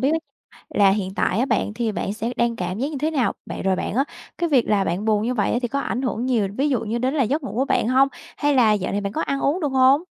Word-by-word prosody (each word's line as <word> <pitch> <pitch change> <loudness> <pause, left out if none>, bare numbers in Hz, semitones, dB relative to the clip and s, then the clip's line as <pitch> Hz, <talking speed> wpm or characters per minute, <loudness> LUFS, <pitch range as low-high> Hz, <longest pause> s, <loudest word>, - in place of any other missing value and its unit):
biết 270 - +2 0.6
là 200 -1 +4
hiện 195 -1 -1
tại 200 - +1
á, 260 - +2
bạn 220 -3 0
thì 230 -1 -1
bạn 200 -1 -3
sẽ 230 +2 -3
đang 235 -1 +1
cảm 185 0 -4
giác 275 - 0
như 295 - -4
thế 310 +3 0
nào? 270 -6 +1
Bạn - - -6
rồi 190 0 +2
bạn - - -3
á, 270 - +3 0.3
cái 340 - 0
việc 260 -6 +3
là 205 -2 +2
bạn 190 +3 -2
buồn 215 -1 +2
như 245 - 0
vậy 210 -5 0
á, 240 - +1
thì 245 - 0
có 280 +3 -2
ảnh 255 -2 -2
hưởng 245 -2 -2
nhiều, 235 -6 +1
ví 285 +3 +2
dụ 255 -4 +1
như 225 +2 -2
đến 255 +3 0
là 285 -4 +2
giấc 285 +7 -1
ngủ 265 - -5
của 260 +3 +1
bạn 230 - +1
hông? 265 +2 +4 0.3
Hay 290 0 +2
là 230 -5 +5
dạo 190 -3 -1
này 205 +1 -1
bạn 200 0 -4
có - - -1
ăn 275 - -1
uống, 295 +7 +1
được 295 - 0
hông? 265 +4 +4
240 Hz, 305 wpm, -22 LUFS, 210-275 Hz, 0.6 s, là